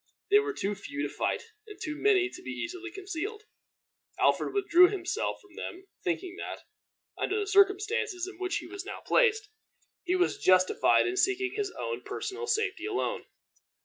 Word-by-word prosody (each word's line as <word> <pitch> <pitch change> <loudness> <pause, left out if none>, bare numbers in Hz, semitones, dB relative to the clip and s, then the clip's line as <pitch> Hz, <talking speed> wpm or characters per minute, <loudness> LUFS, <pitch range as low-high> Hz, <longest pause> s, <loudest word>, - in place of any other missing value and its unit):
They 410 - +8
were 420 0 -2
too 205 - -2
few 285 +9 -5
to - - -3
fight, - - -1 0.2
and 420 - -11
too 305 -1 -4
many 380 +1 +3
to 365 - -10
be - - -8
easily 360 +1 -5
concealed. 390 +3 -5 0.8
Alfred - - +3
withdrew 365 -3 +6
himself 380 +2 -2
from 400 -4 -21
them, 370 +2 -7 0.2
thinking 365 0 -2
that, - - -6 0.6
under 415 +2 0
the 410 - -1
circumstances 400 0 +2
in 385 -2 -10
which 370 0 -1
he - - -6
was 395 -1 -7
now 390 - -7
placed, 440 -4 +3 0.5
he 360 0 +1
was 360 -1 +1
justified 185 0 +4
in 365 +1 -1
seeking 380 0 +2
his 415 -2 -1
own 470 - -3
personal 450 +2 -5
safety 420 -5 0
alone. 405 -2 -2
385 Hz, 170 wpm, -29 LUFS, 360-415 Hz, 0.8 s, They